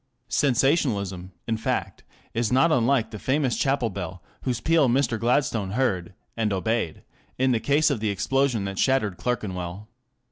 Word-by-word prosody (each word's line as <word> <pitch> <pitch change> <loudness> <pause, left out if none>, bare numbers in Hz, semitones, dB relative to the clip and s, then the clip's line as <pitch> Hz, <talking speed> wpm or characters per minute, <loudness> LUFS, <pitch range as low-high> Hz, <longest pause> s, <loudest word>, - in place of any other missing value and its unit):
Sensationalism, 115 - +1 0.2
in 115 -1 0
fact, 110 - -2 0.3
is 115 -1 0
not 135 +6 +4
unlike 120 -3 +2
the 105 - -7
famous 130 -1 +1
chapel 135 -5 +1
bell 95 -2 -6 0.2
whose 125 -3 -1
peal 155 0 +3
Mr. 120 -2 +1
Gladstone 115 -5 +1
heard 100 -8 -1 0.2
and 110 -2 0
obeyed 95 -2 -1 0.3
in 130 0 +2
the 115 - +2
case 145 +6 +3
of 135 - -1
the 110 0 -1
explosion 125 +1 +1
that 95 -1 -4
shattered 120 -9 +2
Clerkenwell. 100 -4 -3
115 Hz, 150 wpm, -25 LUFS, 100-135 Hz, 0.3 s, not